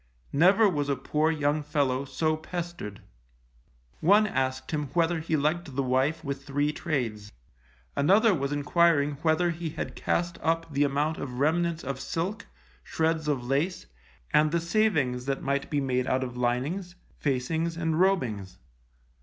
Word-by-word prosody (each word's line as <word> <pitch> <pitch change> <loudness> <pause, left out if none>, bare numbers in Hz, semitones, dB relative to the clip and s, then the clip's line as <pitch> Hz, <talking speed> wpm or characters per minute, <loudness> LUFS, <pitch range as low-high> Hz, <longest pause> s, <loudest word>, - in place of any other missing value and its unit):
Never 190 +9 +5
was 145 -6 -1
a 140 - +2
poor 150 +4 0
young 150 -1 +1
fellow 140 -3 0
so 155 +4 0
pestered! 170 - -6 1.0
One 205 +6 +5
asked 130 -7 -2
him 150 -2 -1
whether 170 0 +2
he 160 0 0
liked 150 0 -1
the 140 - +1
wife 135 +5 +1
with 140 -2 -4
three 145 +1 0
trades? 110 -10 -3 0.6
Another 200 +9 +4
was 140 -4 -2
enquiring 145 0 +2
whether 170 +2 +2
he 165 0 -4
had - - -5
cast 175 0 -1
up 165 -1 -1
the 140 +1 +3
amount 145 +3 0
of 125 -2 -5
remnants 165 +3 +1
of 135 0 -4
silk, 190 +9 -3 0.4
shreds 160 -1 0
of 135 -5 -1
lace, 140 - -1 0.5
and 150 0 +4
the 170 - +2
savings 165 -9 +1
that 135 0 -2
might 140 0 -1
be 145 - 0
made 130 -2 0
out 130 0 +1
of 125 -1 -6
linings, 135 +10 -1 0.2
facings, 160 +5 -1
and 160 -1 0
robings? 110 - 0
150 Hz, 155 wpm, -27 LUFS, 135-170 Hz, 1.0 s, Never